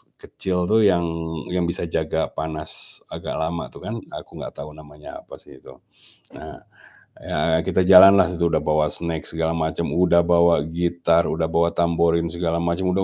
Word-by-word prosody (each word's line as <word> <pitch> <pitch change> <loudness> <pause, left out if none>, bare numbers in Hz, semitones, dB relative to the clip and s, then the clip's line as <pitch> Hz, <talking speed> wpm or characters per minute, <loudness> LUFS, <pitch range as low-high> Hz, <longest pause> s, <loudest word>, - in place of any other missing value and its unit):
kecil 90 -1 -3
itu 110 +1 +3
yang 85 -2 +1 0.5
yang 90 -1 -1
bisa 85 0 -1
jaga 80 -1 -2
panas 80 0 -3
agak - - -6
lama 80 +1 -3
tuh - - -14
kan, - - -5 0.2
aku - - -11
nggak - - -8
tahu 75 +2 -8
namanya 75 -1 -12
apa - - -13
sih 65 - -14
itu. 65 -1 -15 0.6
Nah, - - -10 0.6
ya 80 +1 -1
kita 95 - +1
jalanlah 95 +1 +8
udah 85 -2 0
bawa 75 0 +1
snack 85 -2 -3
segala 80 0 -1
macam, 80 0 -3
udah 85 -1 +3
bawa 85 -3 +3
gitar, 85 0 0
udah 80 +1 -1
bawa 85 +1 +2
tamborin 85 -1 +1
segala 85 -1 -2
macam, 85 +2 -1
udah 95 - +1
85 Hz, 165 wpm, -21 LUFS, 80-85 Hz, 0.6 s, jalanlah